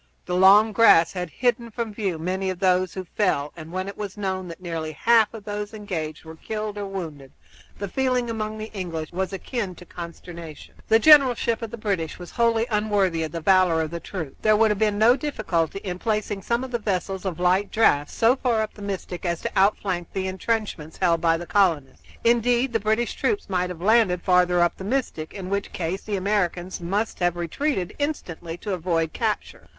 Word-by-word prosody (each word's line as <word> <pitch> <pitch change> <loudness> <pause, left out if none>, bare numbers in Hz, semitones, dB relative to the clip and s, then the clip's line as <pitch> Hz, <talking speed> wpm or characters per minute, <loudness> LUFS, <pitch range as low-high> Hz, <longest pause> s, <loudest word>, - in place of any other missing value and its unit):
The 180 - -4
long 200 +4 +7
grass 205 -6 +6
had 180 -2 -4
hidden 240 +3 0
from 225 -1 -4
view 195 -6 -2
many 185 +4 -2
of 185 - -3
those 185 -1 +2
who 190 - -4
fell, 160 -6 0
and 160 -1 -10
when 185 +1 -3
it 200 - -6
was 205 -1 -6
known 190 -2 -3
that 170 +1 -9
nearly 165 -3 -4
half 225 +7 +4
of 225 -3 -9
those 210 +1 -5
engaged 165 -8 -5
were 160 0 -9
killed 215 +2 -4
or 200 - -4
wounded 160 -8 -7 0.5
the 200 - -4
feeling 255 +2 0
among 215 -1 -3
the 215 +1 -7
English 165 -5 -4
was 190 +2 -2
akin 195 0 -4
to 180 - -13
consternation. 170 -2 -9
The 225 - +6
generalship 250 -4 +5
of 230 - -4
the 235 - -7
British 195 -7 -2
was 175 -1 -10
wholly 230 -1 +2
unworthy 205 -5 +1
of 160 - -3
the 165 - -5
valor 185 -1 +4
of 160 -1 -2
the 170 - -4
troops. 165 -5 -6
There 215 -1 +4
would 220 0 +4
have 205 - -1
been 210 -2 +2
no 225 +4 +6
difficulty 200 - -1
in 180 -2 -4
placing 210 -2 -1
some 235 +5 -1
of 260 - -6
the 240 - -1
vessels 195 -2 -2
of 180 -4 -4
light 185 +3 +2
draught 145 -10 +3
so 230 +3 +3
far 240 -4 +1
up 215 - -6
the 210 - -13
Mystic 195 -3 -5
as 170 -2 -1
to - - -3
outflank 190 -3 +1
the 190 -1 -2
intrenchments 190 -5 -3
held 170 -3 +2
by 165 -1 +3
the 175 - -7
colonists. 170 -9 +1 0.2
Indeed, 240 +2 +2
the 225 - +2
British 220 +3 0
troops 405 - -1
might 180 -1 0
have 180 - -6
been 175 - -7
landed 215 -5 +4
further 180 -1 +3
up 175 - +2
the - - -7
Mystic, 205 -8 -2
in 190 -1 -6
which 200 0 -2
case 180 +2 -3
the 210 - -3
Americans 185 -2 -1
must 200 +6 -2
have 175 -1 +1
retreated 185 - -2
instantly 175 - -4
to 205 +2 -4
avoid 165 -3 -1
capture. - - -3
190 Hz, 205 wpm, -24 LUFS, 175-220 Hz, 0.5 s, long